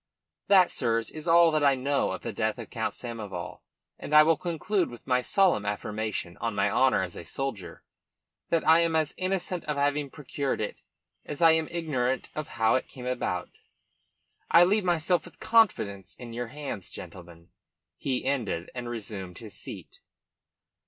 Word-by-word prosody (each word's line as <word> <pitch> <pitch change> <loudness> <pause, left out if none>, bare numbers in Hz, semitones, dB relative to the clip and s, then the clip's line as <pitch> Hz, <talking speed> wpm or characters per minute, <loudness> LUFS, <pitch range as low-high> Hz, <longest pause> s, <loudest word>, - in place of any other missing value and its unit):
"That, 190 -3 +6
sirs, 115 0 0
is 155 +1 -8
all 170 0 +6
that 155 -1 +1
I 140 -1 +5
know 140 +2 0
of - - -6
the - - -4
death - - -1
of - - -9
Count - - -2
Samoval, 105 -7 -6 0.4
and 150 - -2
I 150 - +10
will 165 +1 +4
conclude 180 +3 -1
with 120 - -12
my 125 -1 +2
solemn 185 - +3
affirmation, 105 -3 -3
on 115 -2 -3
my 100 0 +2
honour 130 -7 +3
as 90 - -6
a - - -7
soldier, 100 -4 -5 0.7
that 165 -2 +1
I 160 +1 +7
am 165 -1 +1
as 155 -2 +1
innocent 185 -2 -2
of 150 -1 -2
having 145 0 +1
procured 140 -1 -3
it 105 - -3 0.5
as 145 - -7
I 165 -1 +7
am 160 -1 +2
ignorant 135 -7 -1
of 155 -1 -4
how 110 0 +4
it 130 - 0
came 125 -2 -10
about. 120 -8 -2 1.0
"I 170 - +8
leave 205 +4 +3
myself 175 -1 +2
with - - -14
confidence 105 - +2
in 120 -2 -9
your 120 +1 -3
hands, 135 -7 -6
gentlemen," 85 -1 -11 0.5
he 130 -2 -2
ended, 120 -11 -1
and 125 -1 -5
resumed 100 -6 -6
his 110 -4 -9
seat. - - -9
135 Hz, 170 wpm, -28 LUFS, 110-160 Hz, 1.0 s, I